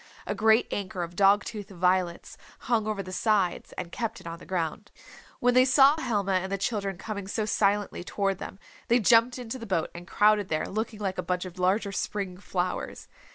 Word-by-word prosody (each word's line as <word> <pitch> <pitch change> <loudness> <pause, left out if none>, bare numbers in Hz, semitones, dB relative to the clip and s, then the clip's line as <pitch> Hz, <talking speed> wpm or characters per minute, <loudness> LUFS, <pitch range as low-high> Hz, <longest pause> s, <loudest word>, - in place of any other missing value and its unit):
A - - -2
great 220 +1 +4
anchor 185 -3 -3
of 170 +1 -7
dog 200 +2 +5
tooth 210 -3 -7
violets 180 -1 0 0.3
hung 225 -3 0
over 210 -2 -2
the 185 - -8
sides 195 -2 0
and 175 -2 -6
kept 230 +1 -3
it - - -16
on 165 0 -6
the - - -14
ground. 185 +3 -3 0.5
When 245 0 +3
they 255 +1 +6
saw 270 +2 +6
Helma 205 -6 0
and 190 0 0
the 195 - 0
children 195 -2 -2
coming 200 0 -6
so 215 +2 -1
silently 205 -3 0
toward 195 0 -1
them 190 - -7 0.3
they 240 +1 +4
jumped 230 +4 +4
into 250 +1 -6
the 230 - -8
boat 170 -5 -1
and 175 +1 -10
crowded 210 -1 +3
there 155 -1 0
looking 220 +2 -3
like 190 -2 -2
a - - +2
bunch 180 +1 -2
of 185 0 -9
larger 195 +3 +1
spring 195 -2 -3
flowers. 180 -2 -3
200 Hz, 200 wpm, -27 LUFS, 185-220 Hz, 0.5 s, they